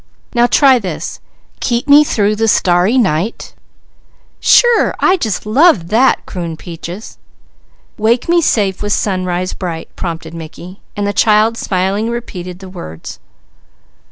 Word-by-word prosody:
Now 240 Hz, -1 st, +3 dB
try 265 Hz, -1 st, +4 dB
this: 190 Hz, -5 st, -6 dB, 0.4 s
Keep 240 Hz, +2 st, -1 dB
me 290 Hz, +1 st, +7 dB
through 210 Hz, -7 st, 0 dB
the 225 Hz, +1 st, 0 dB
starry 185 Hz, +3 st, +2 dB
night 190 Hz, -2 st, -1 dB, 0.5 s
" -, -, -37 dB
"Sure! 480 Hz, -2 st, +4 dB
I 370 Hz, -, +3 dB
just 220 Hz, -, -3 dB
love 220 Hz, -, +3 dB
that," 245 Hz, +5 st, +2 dB
crooned 170 Hz, -4 st, -6 dB
Peaches. 175 Hz, +4 st, -9 dB, 0.8 s
"Wake 230 Hz, +3 st, +1 dB
me 340 Hz, 0 st, +3 dB
safe 200 Hz, -, 0 dB
with 205 Hz, 0 st, -1 dB
sunrise 185 Hz, -2 st, -2 dB
bright," 170 Hz, -3 st, -6 dB
prompted 165 Hz, -1 st, -6 dB
Mickey, 170 Hz, +3 st, -10 dB, 0.2 s
and 205 Hz, -, -1 dB
the 205 Hz, -, -1 dB
child 215 Hz, +3 st, +3 dB
smilingly 195 Hz, +2 st, -1 dB
repeated 185 Hz, -7 st, -6 dB
the 190 Hz, 0 st, -11 dB
words. 80 Hz, -, -9 dB
205 Hz, 135 wpm, -15 LUFS, 180-235 Hz, 0.8 s, me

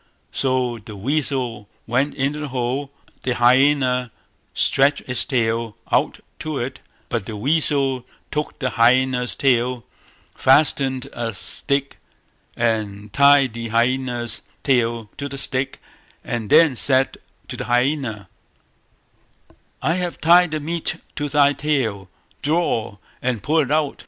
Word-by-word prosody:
So 130 Hz, -3 st, 0 dB
the 105 Hz, 0 st, -10 dB
weasel 125 Hz, -3 st, -2 dB, 0.2 s
went 130 Hz, +5 st, 0 dB
into 140 Hz, +3 st, -1 dB
the 150 Hz, -, -4 dB
hole, 130 Hz, +2 st, -2 dB, 0.3 s
the 125 Hz, -2 st, -1 dB
hyaena 125 Hz, 0 st, +3 dB, 0.4 s
stretched 140 Hz, +1 st, +3 dB
its 125 Hz, -3 st, -1 dB
tail 115 Hz, -5 st, -1 dB
out -, -, +1 dB, 0.2 s
to 155 Hz, -2 st, -4 dB
it, 130 Hz, +1 st, -4 dB, 0.3 s
but 115 Hz, -5 st, -3 dB
the 110 Hz, -2 st, -5 dB
weasel 135 Hz, -1 st, 0 dB, 0.2 s
took 150 Hz, 0 st, -3 dB
the 130 Hz, -, -2 dB
hyaena's 125 Hz, +1 st, +2 dB
tail, 125 Hz, -2 st, +1 dB, 0.5 s
fastened 135 Hz, -1 st, +2 dB
a 115 Hz, -3 st, -4 dB
stick, 140 Hz, +8 st, -2 dB, 0.6 s
and 105 Hz, -3 st, -2 dB
tied 140 Hz, -3 st, +5 dB
the 115 Hz, 0 st, -5 dB
hyaena's 120 Hz, +1 st, 0 dB, 0.2 s
tail 115 Hz, -5 st, +1 dB
to 140 Hz, 0 st, -4 dB
the 140 Hz, -, -7 dB
stick, 135 Hz, 0 st, -1 dB, 0.4 s
and 115 Hz, -3 st, -4 dB
then 160 Hz, -6 st, +6 dB
said 130 Hz, +2 st, +3 dB, 0.3 s
to -, -, -4 dB
the -, -, -5 dB
hyaena 120 Hz, -4 st, 0 dB, 1.6 s
"I 160 Hz, -, +2 dB
have 175 Hz, -1 st, -3 dB
tied 175 Hz, +2 st, +5 dB
the 155 Hz, 0 st, -2 dB
meat 165 Hz, +2 st, -2 dB, 0.2 s
to 145 Hz, -1 st, -2 dB
thy 145 Hz, 0 st, +4 dB
tail; 120 Hz, -11 st, -1 dB, 0.3 s
draw, 145 Hz, -9 st, 0 dB, 0.2 s
and 125 Hz, -5 st, -2 dB
pull 160 Hz, +2 st, +2 dB
it 140 Hz, -4 st, +1 dB
out". 150 Hz, -1 st, 0 dB
130 Hz, 130 wpm, -21 LUFS, 120-140 Hz, 1.6 s, then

